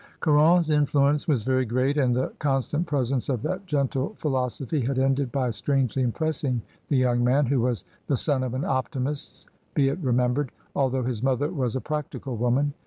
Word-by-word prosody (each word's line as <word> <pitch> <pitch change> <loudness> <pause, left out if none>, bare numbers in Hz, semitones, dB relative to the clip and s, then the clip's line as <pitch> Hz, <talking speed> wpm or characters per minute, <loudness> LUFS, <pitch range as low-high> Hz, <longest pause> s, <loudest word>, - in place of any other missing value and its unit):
Caron's 160 +2 +4
influence 145 0 +2
was 135 -9 +1
very 130 +1 +2
great, 130 +4 0
and 130 -5 +2
the 130 - -1
con 135 -2 +2
stant 150 +6 -2
presence 135 -4 0
of 125 -5 -1
that 185 +1 -3
gentle 140 -3 -1
philosophy 135 0 -1
had 130 +2 -1
ended 135 -1 +1
by 130 -3 0
strangely 130 +3 0
impressing 130 -2 -1 0.3
the 140 - +2
young 120 -1 +2
man, 135 +4 +3
who 130 -1 +1
was 120 -1 -1 0.2
the 140 - +1
son 140 -2 +1
of 130 -1 -3
an 130 - -2
optimist 135 +2 -3 0.3
be 135 -2 +3
it 145 +6 -3
remembered, 125 -1 +1 0.3
although 130 -2 +1
his 120 -3 -2
mother 135 +2 +1
was 130 -8 -2
a 130 - -1
practical 150 -4 -4
woman. 125 +5 +1
135 Hz, 180 wpm, -25 LUFS, 125-145 Hz, 0.3 s, Caron's